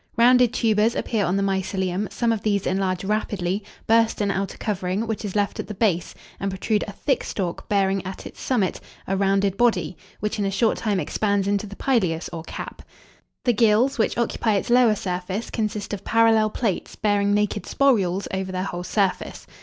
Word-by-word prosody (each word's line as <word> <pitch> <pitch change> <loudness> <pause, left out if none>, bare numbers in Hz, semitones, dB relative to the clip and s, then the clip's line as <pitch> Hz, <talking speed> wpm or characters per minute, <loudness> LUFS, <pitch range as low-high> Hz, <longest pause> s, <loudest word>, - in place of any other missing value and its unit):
Rounded 245 0 +6
tubers 225 -1 +2
appear 220 -3 0
on 185 +3 +1
the 200 - +1
mycelium; 190 0 -1
some 235 -1 0
of 225 -2 -1
these 200 -2 0
enlarge 185 -1 0
rapidly, 200 -2 -1 0.2
burst 225 0 +3
an 205 -1 +1
outer 195 0 -3
covering, 195 0 -2
which 220 -1 -3
is 205 -2 -5
left 205 -1 0
at - - -4
the 210 - -6
base, 185 -5 0 0.2
and 195 - -1
protrude 205 +3 0
a - - -5
thick 265 +6 -1
stalk, 180 -4 -4
bearing 195 -1 +2
at 190 0 -7
its - - -10
summit 215 -8 0 0.2
a 195 - -1
rounded 195 0 +1
body, 190 -9 +2 0.2
which 210 0 -2
in 205 - +1
a - - +1
short 215 +3 +1
time 210 -4 0
expands 200 0 0
into 205 +1 0
the 200 - -9
pileus 185 -12 0
or 165 - -4
cap. - - -7 0.6
The 245 - +4
gills, 230 +4 +3
which 220 - +1
occupy 230 -2 +1
its 200 - -1
lower 240 -3 +5
surface, 185 +3 -4
consist 210 -2 -3
of 200 -1 -5
parallel 225 -1 +4
plates, 215 -4 -2
bearing 205 -1 +2
naked 210 0 0
sporules 200 -9 +2
over 190 0 -2
their 185 0 -2
whole 175 -2 -4
surface. 195 +1 -1
205 Hz, 190 wpm, -23 LUFS, 190-220 Hz, 0.6 s, Rounded